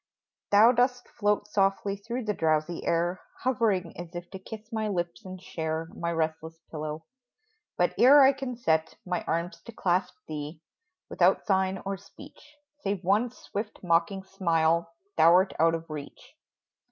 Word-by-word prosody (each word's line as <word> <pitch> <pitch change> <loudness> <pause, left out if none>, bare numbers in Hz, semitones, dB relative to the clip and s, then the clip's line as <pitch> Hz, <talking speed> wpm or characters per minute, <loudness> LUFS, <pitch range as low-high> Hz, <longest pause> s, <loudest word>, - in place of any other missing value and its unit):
Thou 215 +4 +7
dost 250 0 +1
float 205 -2 0
softly 195 -1 +1
through 235 +4 -5
the 210 - 0
drowsy 160 0 0
air 175 +2 0 0.2
Hovering 215 -9 +1
as 175 0 -9
if 175 0 -7
to 190 - -7
kiss 220 +2 -10
my 220 -1 -1
lips 175 -4 -3
and 185 -1 -8
share 160 -1 -4
My 170 0 -3
restless 160 0 -2
pillow; 155 0 -5 0.7
but - - +2
ere 275 +3 +8
I 270 +1 +6
can 265 -2 -5
set 160 -7 +1
My 180 -2 -2
arms 170 +2 -2
to 235 - -10
clasp 180 -3 0
thee, 150 +1 -6 0.5
without - - +2
sign 190 -2 +1
or 195 0 -2
speech. 290 +8 -16 0.2
Save 200 -7 -2
one 205 +7 +2
swift, 215 -3 -7
mocking 180 +3 +1
smile 170 -3 +1 0.3
thou 170 +1 +7
'rt 185 +2 +3
out 165 +1 +4
of 165 0 -7
reach 150 -2 -9
185 Hz, 155 wpm, -28 LUFS, 165-210 Hz, 0.7 s, ere